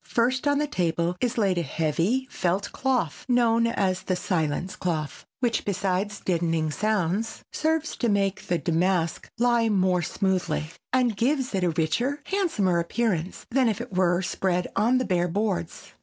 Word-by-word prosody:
First 255 +4 +1
on 285 0 +3
the 300 - +1
table 170 - 0
is 245 -1 0
laid 195 -5 +2
a - - +1
heavy 170 - 0
felt 185 +3 -1
cloth 235 - -1
known 230 -1 +3
as 190 -5 0
the 185 - -1
silence 180 +2 -1
cloth, 155 -5 -3
which, 240 -2 +1
besides 200 +1 -1
deadening 165 -3 0
sounds, 210 +2 -1
serves 320 0 0
to 240 - +1
make 195 -2 0
the 175 - +1
damask 170 0 0
lie 235 -1 +3
more 185 -3 +2
smoothly 175 -3 -1 0.2
and 250 -3 +2
gives 260 +4 0
it 190 -2 0
a 175 - +3
richer, 170 - 0
handsomer 315 - +1
appearance 180 -1 -1
than 255 -1 +3
if 215 - -2
it 240 -4 -7
were 180 0 +2
spread 180 -1 -1
on 240 +4 +3
the 255 - 0
bare 175 -2 +1
boards. 180 -2 -3
195 Hz, 160 wpm, -26 LUFS, 175-235 Hz, 0.2 s, on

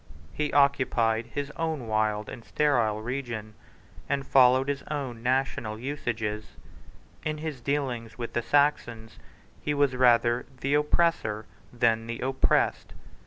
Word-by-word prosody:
He 150 -1 -1
occupied 125 -5 +2
his 145 +4 -4
own 160 -6 -2
wild 110 -1 0
and 115 - -8
sterile 115 -9 +1
region, 120 -4 -4 0.6
and 140 0 -1
followed 130 0 +5
his 140 -1 -1
own 135 -6 -4
national 125 -3 -1
usages. 110 -5 -4 0.7
In 155 0 -2
his 150 -4 -5
dealings 125 -4 -2
with 120 -2 -5
the 120 - 0
Saxons, 120 -5 0 0.4
he 150 - -1
was 140 -2 +2
rather 120 -1 +3
the 140 +1 0
oppressor 150 -8 +1 0.3
than 115 -2 +1
the 115 0 -4
oppressed. 130 +1 +1
125 Hz, 125 wpm, -27 LUFS, 115-140 Hz, 0.7 s, followed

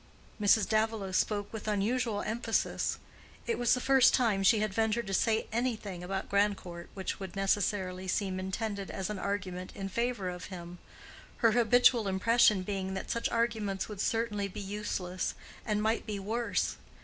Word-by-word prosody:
Mrs. 210 +1 +4
Davilow 220 -3 0
spoke 205 +2 0
with 220 -1 -6
unusual 215 +1 0
emphasis: 225 +1 -1 0.5
it 470 - -1
was 240 0 +4
the - - -2
first 265 0 +5
time 220 -6 +2
she 195 +3 +5
had 215 -1 -1
ventured 225 +2 +1
to 195 - -4
say 220 +3 +2
anything 220 -6 -2
about 190 +2 -3
Grandcourt 200 -4 -1
which 190 -1 -4
would 190 -1 -7
necessarily 195 -1 0
seem 185 0 -1
intended 200 +1 -3
as 190 +1 -3
an 205 - -4
argument 185 -2 -3
in 195 0 -4
favor 235 -1 -1
of 180 0 -5
him, 175 -1 -8 0.7
her 225 - +7
habitual 240 -1 +4
impression 210 +1 +4
being 190 -1 -3
that 190 - -4
such 235 - 0
arguments 220 -4 -1
would 210 -2 -5
certainly 215 -3 0
be 190 - -8
useless 195 -3 -3 0.3
and 210 -1 +1
might 220 +2 0
be 210 -1 -2
worse. 225 +4 -1
205 Hz, 160 wpm, -31 LUFS, 190-225 Hz, 0.7 s, her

